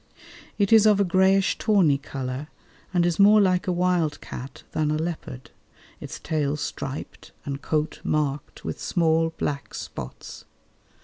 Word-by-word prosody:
It 200 +1 +2
is 220 -1 +7
of 210 -1 +5
a - - +5
greyish 190 +1 +3
tawny 185 -10 +3
colour 135 0 -5 0.4
and 175 -2 +2
is 175 0 0
more 210 +2 +7
like 185 -2 +2
a - - +2
wild 175 -3 +1
cat 125 -1 -9
than 155 -1 0
a 155 - +1
leopard, 155 -6 -5 0.5
its - - -7
tail 150 -2 -1
striped 145 -1 -6
and 140 0 -4
coat 155 0 -2
marked 145 -2 -2
with - - -4
small 165 -1 +2
black 140 -1 -3
spots. 60 - -8
160 Hz, 145 wpm, -25 LUFS, 145-185 Hz, 0.5 s, is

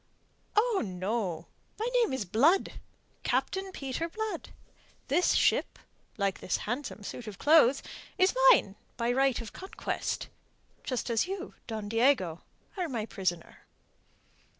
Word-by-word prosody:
"Oh, 430 -1 +3
no, 185 -3 -2 0.3
my 440 - -1
name 485 -3 +3
is 260 -6 -2
Blood 280 - +3 0.4
Captain 385 0 -1
Peter 285 +1 -3
Blood. 440 +4 -4 0.6
This 340 +7 +3
ship, - - +2 0.4
like 200 -2 0
this - - -1
handsome 245 -2 -4
suit 230 +3 -7
of 205 -2 -7
clothes, 290 -2 +5 0.3
is 370 +1 +4 0.2
mine 200 - +4 0.2
by 235 0 +1
right 265 0 +2
of 225 - -9
conquest. 380 - -4 0.6
Just 255 -2 -2
as 230 +8 +2
you, 385 +1 -5
Don 220 -3 -4
Diego, 225 - +2 0.4
are 360 -3 -1
my 230 -5 -2
prisoner." 180 -6 -3
250 Hz, 125 wpm, -30 LUFS, -, 0.6 s, clothes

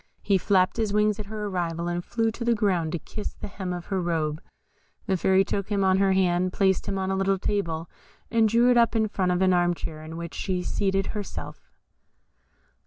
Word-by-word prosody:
He 195 -2 +3
flapped 185 +1 +2
his 220 -3 0
wings 210 0 +2
at 210 - -5
her 215 0 -5
arrival, 170 -3 -2
and 175 0 -2
flew 225 +2 0
to 235 - -6
the 235 0 +2
ground 185 -7 +1
to - - 0
kiss 210 +6 -7
the - - -7
hem 190 -2 -5
of 175 -1 -5
her 190 - +1
robe. 160 -2 -1 0.6
The 190 - +1
Fairy 190 +2 +3
took 200 0 -3
him 200 -2 +1
on 190 0 +3
her 195 -1 +3
hand, 185 -1 +2
placed 190 -2 +1
him 195 - -1
on 190 0 -1
a - - 0
little 195 0 +1
table, 170 -5 -2 0.4
and 225 -1 +4
drew 235 +3 +4
it 245 - +4
up 235 0 +4
in 220 -1 +2
front 185 -3 0
of 180 +1 +1
an 185 -1 +4
arm 175 0 +2
chair, 155 -2 -7
in 160 +1 -8
which 170 -1 -6
she 180 -2 -2
seated 195 0 0
herself. 210 -2 -7
190 Hz, 220 wpm, -26 LUFS, 175-210 Hz, 0.6 s, and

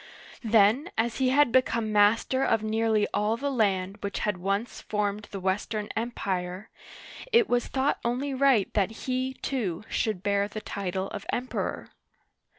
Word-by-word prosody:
Then 225 +6 +4
as 230 +1 0
he 260 -1 +3
had 280 -1 +4
become 230 -4 +2
master 220 +6 +3
of 225 -4 +2
nearly 220 -1 +2
all 215 +2 +1
the 280 +3 -2
land 195 -5 0
which 200 - -3
had 210 -3 0
once 200 +5 -2
formed 210 0 -2
the 195 - -6
Western 205 +3 -2
Empire, 190 -4 -3 0.6
it 460 -2 +5
was 245 0 +1
thought 270 +2 0
only 255 +4 -1
right 260 -6 +3
that 200 -2 +2 0.2
he, 260 0 -1
too, 215 -10 -2
should 210 -5 -1
bear 200 0 +1
the 215 +1 -6
title 195 -2 -3
of - - -7
Emperor. 250 +1 -3
215 Hz, 155 wpm, -27 LUFS, 200-255 Hz, 0.6 s, it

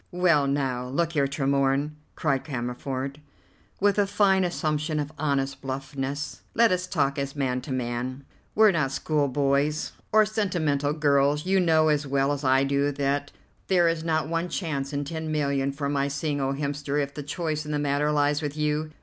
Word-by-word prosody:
"Well, 170 -6 +3
now, 130 -3 -1
look 165 +6 0
here, 140 -3 +2
Tremorne," 140 +1 +1 0.2
cried 140 -4 0
Cammerford, 130 +1 -4 0.6
with 205 0 +3
a 200 - +3
fine 195 -1 +3
assumption 155 -3 -1
of 145 0 -3
honest 140 -2 -1
bluffness, 135 +1 -4
"let 230 -2 +5
us 180 0 0
talk 145 -5 0
as 140 0 -3
man 130 -3 -1
to 135 - -8
man. 125 +1 -3 0.3
We're 215 -1 +6
not 150 -6 0
school 145 +1 0
boys 140 +3 +1 0.2
or 215 0 +6
sentimental 165 -9 0
girls. 145 0 +2
You 190 +1 +3
know 160 -3 +4
as 145 -1 +1
well 135 +1 +1
as 145 0 -5
I 135 0 +4
do 140 +1 +1
that 145 +1 -1 0.4
there 175 -3 +4
is 165 -1 0
not 160 -2 0
one 165 +2 -1
chance 140 -7 -3
in 145 0 -2
ten 160 +1 -4
million 140 -2 0
for 140 +1 -3
my 140 -1 0
seeing 140 +1 -2
old 135 0 -1
Hemster 145 0 -2
if 140 -1 -2
the 145 - -5
choice 155 +1 -3
in 150 - -6
the 150 - 0
matter 145 +1 +1
lies 145 0 +2
with 150 0 -4
you. 150 +1 0
145 Hz, 185 wpm, -26 LUFS, 140-155 Hz, 0.6 s, We're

